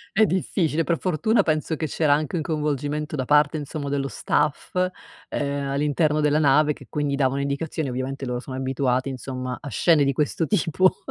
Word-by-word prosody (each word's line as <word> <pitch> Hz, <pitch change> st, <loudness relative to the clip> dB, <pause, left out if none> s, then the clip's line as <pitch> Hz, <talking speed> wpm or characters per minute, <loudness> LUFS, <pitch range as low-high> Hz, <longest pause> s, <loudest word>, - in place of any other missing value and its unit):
È 220 Hz, +2 st, +6 dB
difficile, 170 Hz, -4 st, 0 dB
per 165 Hz, 0 st, 0 dB
fortuna 185 Hz, +6 st, +2 dB
penso 155 Hz, 0 st, -1 dB
che 155 Hz, -, -2 dB
c'era 155 Hz, -1 st, +1 dB
anche 150 Hz, +2 st, -1 dB
un 165 Hz, -, 0 dB
coinvolgimento 150 Hz, -1 st, -2 dB
da 130 Hz, -, -1 dB
parte 150 Hz, +4 st, +3 dB
insomma 145 Hz, -1 st, -4 dB
dello 140 Hz, -1 st, -1 dB
staff, 150 Hz, +3 st, -1 dB, 0.5 s
ehm, 140 Hz, -1 st, -2 dB
all'interno 150 Hz, +2 st, +1 dB
della 150 Hz, 0 st, +3 dB
nave 150 Hz, 0 st, +4 dB
che -, -, -15 dB
quindi 145 Hz, -2 st, -1 dB
davano 135 Hz, -1 st, +1 dB
indicazioni, 140 Hz, +2 st, -2 dB
ovviamente 130 Hz, +2 st, -4 dB
loro 125 Hz, -1 st, -3 dB
sono 130 Hz, 0 st, -7 dB
abituati 130 Hz, -1 st, 0 dB
insomma 130 Hz, -1 st, -5 dB
a 145 Hz, -, -7 dB
scene 160 Hz, 0 st, +3 dB
di 140 Hz, -, +2 dB
questo 150 Hz, +4 st, 0 dB
tipo 185 Hz, -2 st, +2 dB
145 Hz, 180 wpm, -24 LUFS, 135-155 Hz, 0.5 s, È